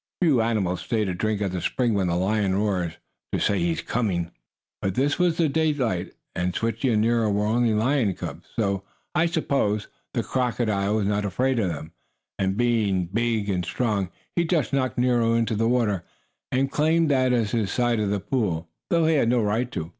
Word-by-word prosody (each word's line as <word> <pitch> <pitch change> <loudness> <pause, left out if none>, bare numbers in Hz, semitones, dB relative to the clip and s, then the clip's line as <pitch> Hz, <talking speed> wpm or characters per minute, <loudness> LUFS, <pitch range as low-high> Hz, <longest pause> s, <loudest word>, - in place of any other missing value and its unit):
Few 150 -10 +4
animals 105 -6 0
stay 110 -2 0
to 95 - -2
drink 105 +3 -1
at 95 - -1
the 90 -1 -3
spring 120 -3 0
when 95 -3 +1
the 85 - 0
lion 95 +1 +1
roars, 95 -5 0 0.4
to - - +1
say 100 -1 +1
he 85 -1 +1
is - - -5
coming. 90 -8 -1 0.5
But 95 -1 -1
this 140 +5 +1
was 175 -2 +2
in 160 -4 +3
daylight 135 - 0 0.2
and 90 0 -1
Switchie 115 +3 0
and 110 -1 +3
Nero 115 -1 +2
were 105 +1 +1
only 115 0 +2
lion 115 -3 +2
cubs, - - -7
so, 100 -4 0 0.3
I 170 0 +3
suppose, 135 - 0 0.3
the - - +1
crocodile 110 -5 0
was 105 -2 +1
not 105 +1 0
afraid 125 +6 0
of 100 -5 +1
them. 80 0 -6 0.5
And, 95 0 0
being 105 -7 +1
big 115 -2 0
and 90 -3 0
strong, 100 +1 -1 0.3
he 170 - +3
just 160 -8 0
knocked 130 -2 0
Nero 120 -2 +3
into 115 -1 +1
the 115 +2 +1
water, 110 -7 +1 0.5
and 135 +1 +1
claimed 160 +1 +2
that 130 -2 +3
as 115 -4 +1
his 110 -5 0
side 120 -2 +1
of 105 -2 0
the 100 0 0
pool, 95 -7 -1 0.2
though 170 -1 +3
he 160 - +3
had 135 -6 +3
no 120 -2 +2
right 115 +4 0
to. 80 0 -4
110 Hz, 200 wpm, -25 LUFS, 100-125 Hz, 0.5 s, Few